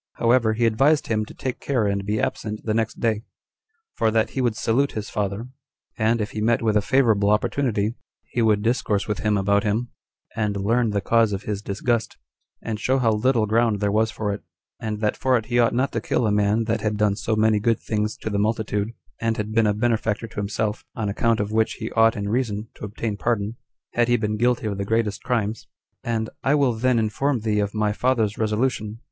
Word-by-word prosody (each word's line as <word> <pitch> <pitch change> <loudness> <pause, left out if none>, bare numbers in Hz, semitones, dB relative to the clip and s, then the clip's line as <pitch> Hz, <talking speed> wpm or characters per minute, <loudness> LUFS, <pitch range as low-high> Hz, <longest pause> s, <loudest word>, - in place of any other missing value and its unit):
However, 115 -1 +3
he 115 +2 +1
advised 135 +7 +3
him 110 -1 0
to - - -12
take 130 -2 -4
care 125 -6 0
and 100 -1 0
be 105 +1 0
absent 105 0 -2
the 110 - 0
next 110 0 -1
day, 110 -2 +1 0.7
for 110 - +1
that 110 0 +1
he 135 - -2
would 120 -3 +1
salute 130 +6 +1
his 105 -1 -5
father, 105 +3 -2 0.5
and, 110 +2 +1
if 105 - -2
he 105 - -4
met 115 +1 +2
with 110 -2 +2
a 105 - +4
favorable 110 -5 +3
opportunity, 105 0 +1 0.3
he 120 - -3
would 105 -2 +3
discourse 110 -3 0
with 105 -2 -2
him 105 -1 +1
about 100 +1 +2
him, 110 +4 -1 0.5
and 105 -2 -1
learn 115 +4 +1
the 100 -1 0
cause 115 0 +3
of 100 - -4
his 105 -1 -3
disgust, 110 +2 -1 0.5
and 110 -2 -3
show 130 +4 +1
how 120 -4 +2
little 115 +1 +2
ground 110 -1 +2
there 100 0 +1
was 110 +1 +2
for 105 -2 -2
it, 100 - -6 0.4
and 105 -1 -4
that 105 -1 +1
for 130 -1 +2
it 115 - -4
he 120 +2 +1
ought 120 - +4
not 130 +3 +1
to 115 - -2
kill 115 - 0
a 105 - +2
man 105 +2 +2
that 115 0 -1
had 105 -1 -1
done 105 -1 +2
so 110 +1 -1
many 110 0 +3
good 115 +2 +1
things 105 0 -2
to 110 - -5
the 100 - 0
multitude, 110 0 -1 0.3
and 115 0 0
had 105 0 -3
been 115 0 +3
a - - +3
benefactor 115 0 0
to 105 -4 -13
himself, 105 +1 -2
on 110 -3 -2
account 115 +3 +1
of 105 0 -2
which 110 0 +2
he 110 - -6
ought 115 0 +4
in 100 0 -3
reason 110 -1 -1
to - - -8
obtain 105 +1 -3
pardon, 110 -1 -1 0.4
had 120 -1 +2
he 120 0 +3
been 105 -1 -1
guilty 120 +1 +1
of 100 -2 -2
the - - 0
greatest 105 -2 0
crimes; 115 -3 -2 0.4
and 110 -1 -2
"I 140 +2 +3
will 140 -4 +3
then 125 +2 +1
inform 115 +4 0
thee 105 -1 0
of 100 +1 -1
my 105 -1 +1
father's 115 -3 +1
resolution." 110 0 -1
110 Hz, 225 wpm, -23 LUFS, 105-115 Hz, 0.7 s, a